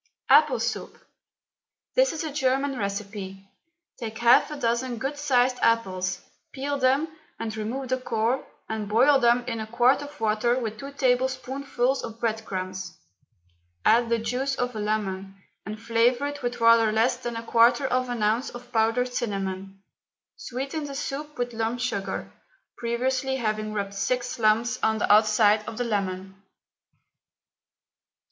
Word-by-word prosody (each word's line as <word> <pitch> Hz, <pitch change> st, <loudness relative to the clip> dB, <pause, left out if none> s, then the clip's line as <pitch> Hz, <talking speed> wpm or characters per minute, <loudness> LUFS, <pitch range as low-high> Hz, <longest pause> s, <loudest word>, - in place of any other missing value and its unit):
APPLE -, -, +6 dB
SOUP. -, -, -3 dB, 1.0 s
This -, -, +4 dB
is 320 Hz, -, -4 dB
a 310 Hz, -3 st, -4 dB
German 270 Hz, 0 st, +1 dB
recipe. 200 Hz, -2 st, -5 dB, 0.5 s
Take 220 Hz, -1 st, -5 dB
half 235 Hz, +2 st, +5 dB
a 300 Hz, -, -5 dB
dozen 240 Hz, -1 st, -1 dB
good 270 Hz, +5 st, -3 dB
sized 255 Hz, -3 st, +2 dB
apples, 190 Hz, -5 st, +1 dB, 0.3 s
peel 280 Hz, +1 st, -3 dB
them 270 Hz, +4 st, +3 dB, 0.3 s
and 220 Hz, -1 st, -4 dB
remove 240 Hz, +5 st, -4 dB
the 255 Hz, 0 st, 0 dB
core, 235 Hz, +1 st, 0 dB, 0.2 s
and 215 Hz, -2 st, -4 dB
boil 265 Hz, +6 st, +5 dB
them 240 Hz, 0 st, +3 dB
in 230 Hz, -2 st, -3 dB
a 220 Hz, -, -4 dB
quart 240 Hz, +5 st, +3 dB
of 290 Hz, +1 st, -10 dB
water 225 Hz, +2 st, +1 dB
with 220 Hz, -3 st, -4 dB
two 275 Hz, +1 st, -7 dB
tablespoonfuls 260 Hz, 0 st, 0 dB
of 225 Hz, 0 st, -7 dB
bread 225 Hz, -1 st, -1 dB
crumbs; 185 Hz, -1 st, -5 dB, 0.9 s
add 235 Hz, +1 st, +4 dB
the 235 Hz, -, +2 dB
juice 250 Hz, +5 st, -1 dB
of 245 Hz, -2 st, -2 dB
a -, -, -3 dB
lemon, 195 Hz, -2 st, -2 dB, 0.3 s
and 215 Hz, 0 st, -5 dB
flavour 235 Hz, +4 st, +2 dB
it 290 Hz, 0 st, -4 dB
with 245 Hz, -1 st, -3 dB
rather 230 Hz, -1 st, +5 dB
less 225 Hz, +4 st, +2 dB
than 240 Hz, -1 st, -5 dB
a 230 Hz, -, -4 dB
quarter 235 Hz, +4 st, +4 dB
of 255 Hz, -1 st, 0 dB
an 240 Hz, -3 st, -2 dB
ounce 220 Hz, +5 st, +1 dB
of 245 Hz, 0 st, -11 dB
powdered 230 Hz, +2 st, +1 dB
cinnamon; 195 Hz, -3 st, -4 dB, 0.5 s
sweeten 275 Hz, +5 st, -4 dB
the 280 Hz, -1 st, -6 dB
soup 295 Hz, +2 st, -5 dB
with 245 Hz, -1 st, -2 dB
lump 225 Hz, +2 st, -2 dB
sugar, 205 Hz, -6 st, -3 dB, 0.4 s
previously 260 Hz, +3 st, -1 dB
having 215 Hz, -3 st, -2 dB
rubbed 200 Hz, -2 st, -3 dB
six 250 Hz, +5 st, -2 dB
lumps 225 Hz, +2 st, +2 dB
on 220 Hz, 0 st, +2 dB
the 210 Hz, -, +3 dB
outside 215 Hz, 0 st, +4 dB
of 220 Hz, -, -6 dB
the 245 Hz, -, 0 dB
lemon. 195 Hz, -3 st, -3 dB
235 Hz, 155 wpm, -26 LUFS, 215-260 Hz, 1.0 s, APPLE